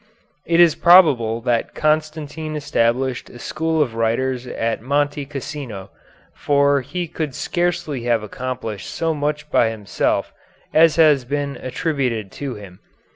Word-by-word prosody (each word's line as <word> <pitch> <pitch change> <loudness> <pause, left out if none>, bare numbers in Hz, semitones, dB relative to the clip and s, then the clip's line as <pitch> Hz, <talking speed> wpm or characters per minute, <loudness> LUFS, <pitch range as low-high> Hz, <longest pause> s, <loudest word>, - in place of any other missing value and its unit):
It 170 0 +2
is 170 -3 +7
probable 140 -12 +5
that 120 -1 -1
Constantine 155 0 -1
established 130 -2 0
a - - -12
school 160 +5 0
of 120 -5 -6
writers 120 +3 -1
at 115 -2 -2
Monte 145 +2 -1
Cassino, 135 -8 -7 0.4
for 140 -1 +2
he 170 +7 -4
could 155 -4 -4
scarcely 175 -7 -2
have 115 -3 +1
accomplished 115 -2 -5
so 165 -1 -1
much 150 0 -3
by 115 - +4
himself 105 -4 -1 0.4
as 160 -1 +5
has 150 -5 +5
been 140 +2 -3
attributed 130 - -2
to 140 -3 -5
him. 95 -3 -12
140 Hz, 130 wpm, -20 LUFS, 120-155 Hz, 0.4 s, is